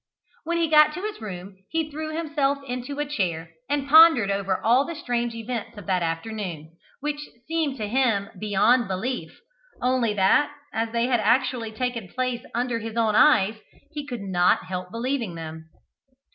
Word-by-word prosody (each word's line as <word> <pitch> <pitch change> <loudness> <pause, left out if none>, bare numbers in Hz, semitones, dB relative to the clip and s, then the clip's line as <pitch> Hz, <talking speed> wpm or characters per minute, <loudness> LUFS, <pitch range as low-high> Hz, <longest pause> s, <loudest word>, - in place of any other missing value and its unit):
When 340 +1 0
he 335 -1 +2
got 305 -1 +5
to 365 - -6
his 425 - -5
room 190 -2 -8
he 320 -1 -2
threw 310 +1 -5
himself 290 -4 0
into 250 +3 -5
a 295 - -1
chair, 170 - -2 0.2
and 285 -1 -1
pondered 310 -9 +7
over 195 -1 -1
all 245 +4 +4
the 335 +3 -6
strange 240 -4 -2
events 230 -1 -5
of 205 - -9
that 185 -2 +1
afternoon, 165 -2 -4 0.3
which 295 0 -2 0.3
seemed 315 -4 -1
to 215 -3 -3
him 220 -4 +1
beyond 215 +4 +3
belief, 220 +7 -4 0.4
only 245 -4 +1
that, 200 +9 +3 0.2
as 225 0 -1
they 235 0 +1
had 245 -2 +2
actually 230 +1 +1
taken 235 -2 -3
place 255 +3 -2
under 240 -1 0
his 225 0 -6
own 225 -2 +2
eyes, 215 +1 +4 0.3
he 295 -2 -6
could 245 -5 -5
not 180 -2 +2
help 180 0 -5
believing 235 -3 -2
them. 160 0 -8
235 Hz, 170 wpm, -25 LUFS, 200-280 Hz, 0.4 s, pondered